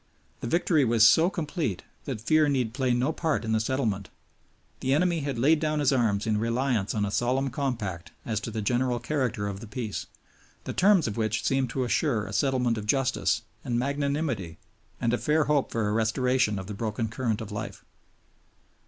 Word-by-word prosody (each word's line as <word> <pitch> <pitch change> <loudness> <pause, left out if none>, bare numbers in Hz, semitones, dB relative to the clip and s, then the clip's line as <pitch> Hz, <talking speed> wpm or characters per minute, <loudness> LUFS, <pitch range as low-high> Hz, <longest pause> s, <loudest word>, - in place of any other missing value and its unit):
The - - -5
victory 160 +1 +2
was 115 -2 +6
so 165 +2 +5
complete 155 - -3 0.2
that - - -4
fear 155 +6 +3
need 125 -5 0
play 130 -1 0
no 125 +6 +1
part 160 -8 -1
in 110 - -2
the 110 - +3
settlement. 110 -5 -1 0.7
The 130 +1 +1
enemy 170 +1 +2
had 140 -4 -3
laid 150 +6 +4
down 155 -1 0
his 145 -2 +3
arms 110 -5 +1
in 110 -1 +1
reliance 115 -2 0
on 105 -1 +1
a 100 - -3
solemn 130 +4 0
compact 115 - -3
as 110 -3 -1
to 110 - -5
the 110 -1 -4
general 125 +2 +1
character 120 -4 -1
of 100 -1 -5
the 115 - -9
Peace, 110 -1 -4 0.6
the - - -5
terms 190 - +4
of 110 - -4
which 110 -1 0
seemed 135 -2 +1
to 130 +2 -1
assure 120 -3 +1
a 100 - -7
settlement 125 -1 +1
of 105 - -7
justice 130 +2 +1 0.2
and 120 - -1
magnanimity 140 - -1 0.4
and 115 0 0
a 120 - +1
fair 155 +1 +2
hope 145 -2 +1
for 115 -2 0
a - - 0
restoration 115 0 +1
of 95 - -5
the 105 - -6
broken 110 +2 -2
current 115 -1 -2
of 110 -2 -7
life. 105 - -6
120 Hz, 195 wpm, -27 LUFS, 110-140 Hz, 0.7 s, was